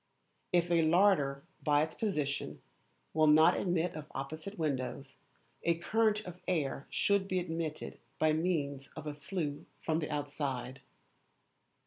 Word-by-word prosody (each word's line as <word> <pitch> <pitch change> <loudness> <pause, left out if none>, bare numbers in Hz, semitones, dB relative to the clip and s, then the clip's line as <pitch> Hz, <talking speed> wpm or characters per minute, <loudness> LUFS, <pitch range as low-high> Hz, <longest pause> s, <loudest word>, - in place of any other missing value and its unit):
If 175 -1 +2
a 170 -1 +5
larder, 160 -5 +3 0.2
by 150 -1 +4
its 160 - -4
position, 150 -10 -2 0.5
will 155 0 +4
not 155 +1 +7
admit 175 -1 0
of 155 -1 -8
opposite 155 +9 -5
windows, 135 -3 -2 0.5
a 170 - +2
current 215 +4 +2
of 180 -3 -10
air 145 -6 -1
should 200 -1 +2
be 185 - 0
admitted 165 -3 -3 0.2
by 155 0 +3
means 150 -5 -1
of 155 - -7
a 150 - -3
flue 150 -1 -4
from 160 0 0
the 155 - -3
outside. 140 -3 -3
155 Hz, 135 wpm, -33 LUFS, 145-175 Hz, 0.5 s, not